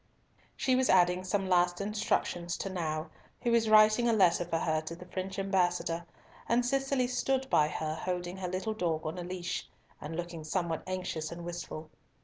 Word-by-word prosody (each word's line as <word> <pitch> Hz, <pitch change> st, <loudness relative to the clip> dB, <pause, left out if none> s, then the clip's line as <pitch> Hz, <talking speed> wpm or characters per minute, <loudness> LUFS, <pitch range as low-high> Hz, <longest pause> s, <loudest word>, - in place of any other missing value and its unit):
She 260 Hz, -, +2 dB
was 260 Hz, 0 st, +2 dB
adding 180 Hz, 0 st, +4 dB
some 195 Hz, +1 st, 0 dB
last 175 Hz, -1 st, +3 dB
instructions 200 Hz, -4 st, -1 dB
to 195 Hz, -, -4 dB
Nau, 155 Hz, -3 st, -3 dB, 0.3 s
who 240 Hz, -, +2 dB
was 230 Hz, -1 st, +3 dB
writing 215 Hz, +2 st, +6 dB
a -, -, +4 dB
letter 180 Hz, -5 st, +4 dB
for 165 Hz, -, -1 dB
her 155 Hz, -1 st, 0 dB
to 160 Hz, +1 st, -6 dB
the 180 Hz, -, -11 dB
French 190 Hz, +1 st, -5 dB
ambassador, 180 Hz, -3 st, 0 dB, 0.4 s
and 240 Hz, +1 st, +3 dB
Cicely 270 Hz, 0 st, +1 dB
stood 260 Hz, +1 st, 0 dB
by 150 Hz, -, +5 dB
her, 155 Hz, 0 st, -3 dB
holding 180 Hz, +2 st, -3 dB
her 185 Hz, -1 st, -3 dB
little 185 Hz, +5 st, -2 dB
dog 165 Hz, -6 st, -1 dB
in 160 Hz, +3 st, -3 dB
a -, -, -4 dB
leash, 180 Hz, 0 st, -4 dB, 0.3 s
and 155 Hz, +2 st, -5 dB
looking 170 Hz, -1 st, -5 dB
somewhat 165 Hz, 0 st, -1 dB
anxious 180 Hz, -4 st, -3 dB
and 170 Hz, 0 st, -7 dB
wistful. 170 Hz, -2 st, -6 dB
180 Hz, 180 wpm, -31 LUFS, 170-210 Hz, 0.4 s, writing